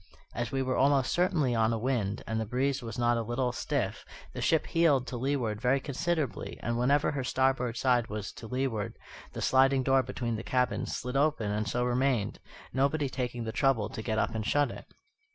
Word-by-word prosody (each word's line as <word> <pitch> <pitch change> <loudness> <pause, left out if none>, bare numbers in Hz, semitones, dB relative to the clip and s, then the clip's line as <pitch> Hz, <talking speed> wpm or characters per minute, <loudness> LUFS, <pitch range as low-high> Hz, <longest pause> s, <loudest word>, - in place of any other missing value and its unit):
As 120 +2 -3
we 135 -1 0
were 130 -1 -1
almost 135 -2 +3
constantly 175 -8 +2
on 110 -1 +2
a 115 - 0
wind, 110 -4 -1
and 110 0 -2
the - - -2
breeze 135 +4 0
was 115 -2 -6
not 120 0 +2
a - - 0
little 120 +2 -1
stiff, - - -2 0.3
the - - -5
ship 160 - +2
heeled 155 -6 +3
to 130 - -6
leeward 120 -4 -1
very 130 +2 +3
considerably; 150 0 -2
and 120 - -1
whenever 140 +5 +2
her 140 -2 -2
starboard 130 -2 +1
side 125 -2 +2
was 105 -1 -5
to 115 - -10
leeward 115 -4 -2 0.4
the - - -4
sliding 135 0 +4
door 135 0 +4
between 120 -2 -3
the - - -4
cabins 125 0 0
slid 125 +1 -5
open 140 -7 +1
and 105 +1 -1
so 120 +4 0
remained, 125 -3 0 0.3
nobody 140 +2 +1
taking 125 -2 -3
the 110 - -3
trouble 120 -5 +1
to 110 - -6
get 110 0 -2
up - - 0
and 110 -1 -3
shut 145 -1 +2
it. - - -9
125 Hz, 205 wpm, -30 LUFS, 115-135 Hz, 0.4 s, sliding